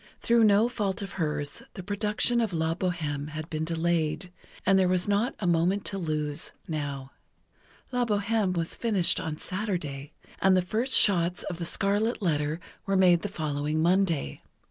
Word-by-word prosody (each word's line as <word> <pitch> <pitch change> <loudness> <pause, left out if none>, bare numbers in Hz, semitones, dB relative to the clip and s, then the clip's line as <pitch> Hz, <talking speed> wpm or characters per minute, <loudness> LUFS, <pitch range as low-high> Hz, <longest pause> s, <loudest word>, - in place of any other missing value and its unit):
Through 235 -1 +4
no 210 +2 +5
fault 205 -5 -2
of 195 - -6
hers, 150 -2 -2
the 190 - -6
production 210 +4 +1
of 220 -5 -1
"La 160 0 0
Bohême" 155 -5 -2
had 155 0 -6
been 155 0 -2
delayed, 165 +1 -1 0.3
and 195 0 +5
there 185 - +4
was 180 0 +1
not 205 +5 +1
a 200 - -3
moment 175 +4 +2
to 195 - -3
lose, 155 -2 -2 0.2
now. 140 -4 -4 0.8
"La 250 -1 +1
Bohême" 205 -3 0
was 165 -1 -2
finished 205 -7 +2
on 155 -1 -4
Saturday, 165 -9 -4 0.3
and 190 -1 +5
the 185 - +2
first 225 +8 -1
shots 180 -3 +3
of 175 -2 -5
"The 170 - -3
Scarlet 205 +6 +1
Letter" 155 -4 0 0.3
were 195 0 +2
made 180 -2 +5
the 205 - -3
following 150 -3 -2
Monday. 170 - +1
180 Hz, 165 wpm, -27 LUFS, 155-200 Hz, 0.8 s, no